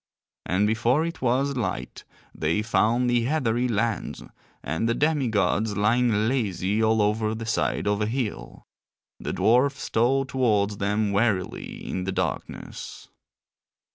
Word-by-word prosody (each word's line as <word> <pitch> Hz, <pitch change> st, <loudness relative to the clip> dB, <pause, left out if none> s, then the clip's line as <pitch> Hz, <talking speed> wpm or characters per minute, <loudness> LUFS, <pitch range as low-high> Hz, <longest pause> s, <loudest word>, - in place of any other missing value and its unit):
And 95 Hz, +3 st, +2 dB
before 120 Hz, +8 st, +2 dB
it 170 Hz, -, -6 dB
was 135 Hz, +3 st, +1 dB
light 95 Hz, -, -4 dB, 0.3 s
they 85 Hz, +7 st, 0 dB
found 115 Hz, +4 st, +2 dB
the 120 Hz, -1 st, +2 dB
heathery 125 Hz, -4 st, +1 dB
lands, 115 Hz, -1 st, -2 dB, 0.4 s
and 80 Hz, +10 st, -1 dB
the 115 Hz, -, +1 dB
demi 150 Hz, -3 st, +1 dB
gods 105 Hz, 0 st, +1 dB
lying 110 Hz, 0 st, +2 dB
lazy 105 Hz, -4 st, 0 dB
all 110 Hz, -1 st, +3 dB
over 110 Hz, +1 st, 0 dB
the 115 Hz, +1 st, -5 dB
side 110 Hz, -, 0 dB
of 105 Hz, 0 st, +1 dB
a 105 Hz, -, +1 dB
hill. 120 Hz, -2 st, -4 dB, 0.5 s
The -, -, -4 dB
dwarfs 135 Hz, +5 st, +2 dB
stole 130 Hz, +4 st, +2 dB
towards 105 Hz, -6 st, +1 dB
them 105 Hz, +1 st, 0 dB
warily 100 Hz, -3 st, -1 dB
in 90 Hz, -, -3 dB
the 95 Hz, -, -1 dB
darkness. 95 Hz, -3 st, -5 dB
110 Hz, 140 wpm, -25 LUFS, 105-125 Hz, 0.5 s, all